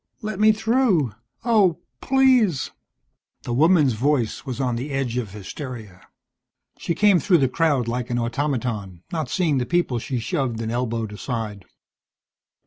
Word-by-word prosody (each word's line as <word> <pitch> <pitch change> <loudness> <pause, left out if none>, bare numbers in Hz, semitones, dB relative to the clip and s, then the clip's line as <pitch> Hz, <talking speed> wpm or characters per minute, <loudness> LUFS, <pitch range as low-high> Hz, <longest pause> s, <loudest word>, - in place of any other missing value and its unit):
"Let 215 -2 -4
me 215 +1 +6
through! 215 - +1 0.3
Oh, 205 -8 +3 0.2
please 255 - +3 0.4
" - - -52
The 120 - -3
woman's 150 -1 +4
voice 125 +1 0
was 130 -1 -4
on 125 -3 0
the 125 +5 -4
edge 135 -4 -2
of 120 -5 -2
hysteria. 105 - -8 0.8
She 170 - -2
came 205 -4 +5
through 175 +3 +3
the 135 -4 +3
crowd 140 -3 +1
like 120 0 -3
an 120 - -1
automaton, 115 - -2
not 160 -6 -2
seeing 160 -6 +1
the 125 - -1
people 175 -9 +1
she 125 +2 -3
shoved 125 -3 -2
and 115 0 -3
elbowed 115 -3 -2
aside. 105 -4 -5
130 Hz, 150 wpm, -23 LUFS, 115-175 Hz, 0.8 s, me